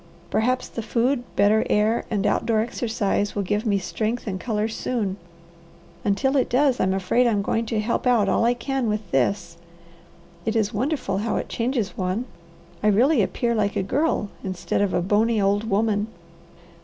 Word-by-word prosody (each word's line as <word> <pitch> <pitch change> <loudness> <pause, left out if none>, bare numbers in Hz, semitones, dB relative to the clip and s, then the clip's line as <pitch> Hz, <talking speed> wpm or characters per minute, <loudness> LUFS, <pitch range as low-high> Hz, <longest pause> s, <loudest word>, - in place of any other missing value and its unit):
Perhaps 250 +3 +1
the 230 - -5
food, 245 +3 0
better 210 +2 +4
air, 215 +3 +2
and 205 -2 -1
outdoor 220 +2 +1
exercise 220 -3 -1
will 205 - 0
give 205 +4 -1
me 200 -2 +3
strength 220 +4 -2
and 190 -4 -3
colour 215 -1 -1
soon. 220 -3 -2 0.9
Until 265 +7 +1
it 260 - +1
does 260 0 +2
I'm 190 0 +2
afraid 195 +6 +2
I'm 210 -4 +1
going 225 +2 -1
to 220 -1 -1
help 235 +4 -1
out 230 -5 +4
all 195 - +2
I 240 +1 +3
can 265 0 -2
with 210 -4 -3
this. 170 +6 0 0.9
It 220 0 -1
is 215 -2 +1
wonderful 245 -4 -1
how 220 +2 -1
it - - -3
changes 230 -5 -1
one. 185 +6 -1 0.6
I 210 - +1
really 240 +6 +4
appear 235 +4 0
like 210 -3 0
a - - 0
girl 260 -1 0
instead 185 +1 -2
of 200 -2 +1
a 175 - +1
bony 215 +4 +2
old 205 +2 +1
woman." 210 0 +1
215 Hz, 175 wpm, -24 LUFS, 200-240 Hz, 0.9 s, better